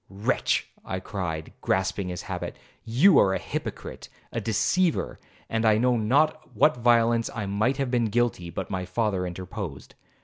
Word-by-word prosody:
'Wretch!' 100 Hz, +2 st, 0 dB, 0.2 s
I 95 Hz, -, -4 dB
cried, 85 Hz, -5 st, -5 dB
grasping 95 Hz, 0 st, 0 dB
his 90 Hz, 0 st, -5 dB
habit, -, -, -5 dB, 0.3 s
'you 135 Hz, -, +5 dB
are 95 Hz, -1 st, +4 dB
a -, -, +1 dB
hypocrite, -, -, -6 dB, 0.2 s
a 115 Hz, -, -3 dB
deceiver!' 160 Hz, -, +1 dB, 0.3 s
and 115 Hz, 0 st, -1 dB
I 110 Hz, -1 st, +5 dB
know 125 Hz, +2 st, +3 dB
not 145 Hz, +8 st, +2 dB
of -, -, -25 dB
what 155 Hz, -4 st, +4 dB
violence 115 Hz, -1 st, +3 dB
I 105 Hz, -3 st, -2 dB
might 110 Hz, +7 st, 0 dB
have 135 Hz, -3 st, -1 dB
been 120 Hz, -2 st, +2 dB
guilty, 115 Hz, -5 st, 0 dB
but 85 Hz, -, -5 dB
my 95 Hz, -1 st, -2 dB
father 95 Hz, -1 st, -1 dB
interposed. 90 Hz, -3 st, -7 dB
110 Hz, 165 wpm, -26 LUFS, 95-120 Hz, 0.3 s, you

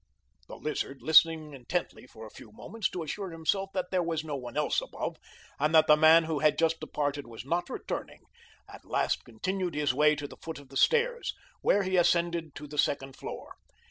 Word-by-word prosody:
The -, -, -9 dB
Lizard, 140 Hz, -2 st, -4 dB
listening 160 Hz, -1 st, +5 dB
intently 135 Hz, +1 st, -4 dB
for 110 Hz, -2 st, -11 dB
a 110 Hz, -, -11 dB
few 110 Hz, -, -13 dB
moments 205 Hz, -, -4 dB
to 175 Hz, -, -5 dB
assure 190 Hz, +5 st, -5 dB
himself 175 Hz, +4 st, -1 dB
that 180 Hz, -1 st, -2 dB
there 185 Hz, -1 st, +2 dB
was 165 Hz, -2 st, -2 dB
no 150 Hz, -2 st, -4 dB
one 125 Hz, -3 st, -7 dB
else -, -, +1 dB
above, -, -, -5 dB, 0.4 s
and 150 Hz, +3 st, +2 dB
that 155 Hz, 0 st, +7 dB
the 150 Hz, -, +7 dB
man 160 Hz, +2 st, +7 dB
who 160 Hz, -2 st, -2 dB
had 150 Hz, +1 st, +3 dB
just 165 Hz, 0 st, +2 dB
departed 145 Hz, -3 st, -3 dB
was 115 Hz, 0 st, -9 dB
not 175 Hz, +4 st, -1 dB
returning, -, -, -5 dB, 0.5 s
at -, -, -13 dB
last -, -, 0 dB
continued 180 Hz, -, -3 dB
his 145 Hz, -2 st, +1 dB
way 150 Hz, +2 st, +4 dB
to 145 Hz, -1 st, -5 dB
the -, -, -13 dB
foot 160 Hz, -1 st, -7 dB
of 140 Hz, -2 st, -14 dB
the 135 Hz, -, -13 dB
stairs, 480 Hz, -, +2 dB, 0.3 s
which 200 Hz, -1 st, +3 dB
he 185 Hz, 0 st, +1 dB
ascended 170 Hz, -2 st, +1 dB
to 150 Hz, -, -8 dB
the 150 Hz, 0 st, -6 dB
second 135 Hz, -2 st, 0 dB
floor. -, -, -8 dB
155 Hz, 205 wpm, -29 LUFS, 145-175 Hz, 0.5 s, that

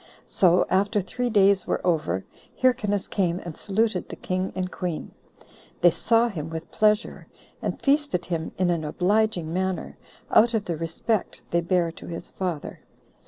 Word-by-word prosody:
So 180 Hz, -2 st, +3 dB
after 200 Hz, +3 st, +2 dB
three 245 Hz, +6 st, -2 dB
days 200 Hz, -3 st, +4 dB
were -, -, 0 dB
over, 125 Hz, -, 0 dB, 0.3 s
Hyrcanus 220 Hz, -6 st, +2 dB
came 180 Hz, -4 st, 0 dB
and 170 Hz, -3 st, -6 dB
saluted 215 Hz, -1 st, -1 dB
the -, -, -6 dB
king 185 Hz, +1 st, -2 dB
and 185 Hz, -1 st, -2 dB
queen. 175 Hz, -4 st, -4 dB, 0.7 s
They 175 Hz, -, +7 dB
saw 230 Hz, +8 st, +3 dB
him 160 Hz, -8 st, -5 dB
with 160 Hz, 0 st, -7 dB
pleasure, 210 Hz, +1 st, +1 dB, 0.3 s
and -, -, -3 dB
feasted 285 Hz, -, +1 dB
him 165 Hz, -2 st, -3 dB
in 180 Hz, -1 st, +2 dB
an 165 Hz, -2 st, -1 dB
obliging 180 Hz, +1 st, +1 dB
manner, 190 Hz, 0 st, -2 dB, 0.3 s
out 230 Hz, +2 st, +5 dB
of 210 Hz, -2 st, -1 dB
the 170 Hz, -, -2 dB
respect 165 Hz, +6 st, -2 dB
they 170 Hz, -, +2 dB
bare 170 Hz, -1 st, +1 dB
to -, -, -11 dB
his 165 Hz, -1 st, -7 dB
father. 180 Hz, -6 st, -4 dB
185 Hz, 160 wpm, -25 LUFS, 170-215 Hz, 0.7 s, They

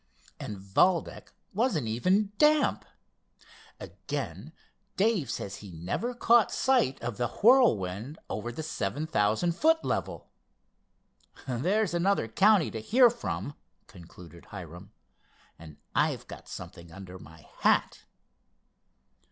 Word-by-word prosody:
And 105 Hz, -, -6 dB
Valdec 100 Hz, -, +1 dB, 0.3 s
wasn't 205 Hz, -, 0 dB
even 185 Hz, -, +1 dB
damp! 300 Hz, 0 st, +3 dB, 0.9 s
Again, -, -, -6 dB, 0.5 s
Dave 200 Hz, -, +1 dB
says 100 Hz, -2 st, -5 dB
he 100 Hz, -, -11 dB
never 95 Hz, -, -3 dB
caught 235 Hz, -3 st, +4 dB
sight 255 Hz, -, +1 dB
of 120 Hz, -2 st, -4 dB
the 120 Hz, -, 0 dB
Whirlwind 140 Hz, -, +2 dB
over 115 Hz, +3 st, -4 dB
the 140 Hz, +7 st, -6 dB
7,000 150 Hz, -, -1 dB
foot 320 Hz, -, +2 dB
level. -, -, -3 dB, 1.2 s
There's 175 Hz, -, 0 dB
another 175 Hz, -, +1 dB
county 195 Hz, -, +3 dB
to 110 Hz, -, -5 dB
hear 240 Hz, -, +5 dB
from!" 235 Hz, -10 st, -5 dB, 0.3 s
concluded 85 Hz, -2 st, -14 dB
Hiram, 90 Hz, +1 st, -10 dB, 0.7 s
"and 80 Hz, -3 st, -12 dB, 0.2 s
I've -, -, 0 dB
got -, -, -11 dB
something 85 Hz, -1 st, -10 dB
under 95 Hz, +1 st, -10 dB
my 75 Hz, 0 st, -15 dB
hat." -, -, +1 dB
135 Hz, 110 wpm, -28 LUFS, -, 1.2 s, hear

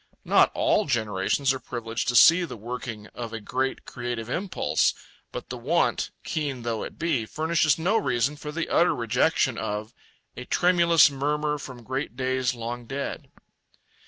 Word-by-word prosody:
Not -, -, +5 dB
all 215 Hz, -, +2 dB
generations 115 Hz, +2 st, +1 dB
are 130 Hz, -, -5 dB
privileged 120 Hz, -2 st, -4 dB
to 120 Hz, -, +1 dB
see 170 Hz, +9 st, +7 dB
the 140 Hz, -8 st, -6 dB
working 115 Hz, -1 st, -6 dB
of 115 Hz, -2 st, -6 dB
a 115 Hz, -, -4 dB
great 130 Hz, +5 st, -2 dB
creative 120 Hz, -2 st, -5 dB
impulse, 190 Hz, +6 st, 0 dB, 0.4 s
but -, -, -7 dB
the 125 Hz, -, -5 dB
want, 150 Hz, +9 st, +1 dB
keen 145 Hz, -6 st, -3 dB
though 115 Hz, -2 st, -2 dB
it -, -, -7 dB
be, 150 Hz, -10 st, -1 dB
furnishes 155 Hz, -1 st, +1 dB
no 185 Hz, +7 st, +2 dB
reason 135 Hz, -, 0 dB
for 150 Hz, 0 st, -7 dB
the 165 Hz, +2 st, -3 dB
utter 175 Hz, -, +3 dB
rejection 115 Hz, -3 st, +1 dB
of 105 Hz, +2 st, -4 dB, 0.4 s
A 125 Hz, -, -7 dB
tremulous 170 Hz, -3 st, +4 dB
murmur 150 Hz, +2 st, -1 dB
from 125 Hz, -4 st, -9 dB
great 130 Hz, 0 st, -4 dB
days 130 Hz, -1 st, 0 dB
long 120 Hz, +1 st, -6 dB
dead. 140 Hz, +2 st, -5 dB
130 Hz, 160 wpm, -26 LUFS, 120-150 Hz, 0.4 s, see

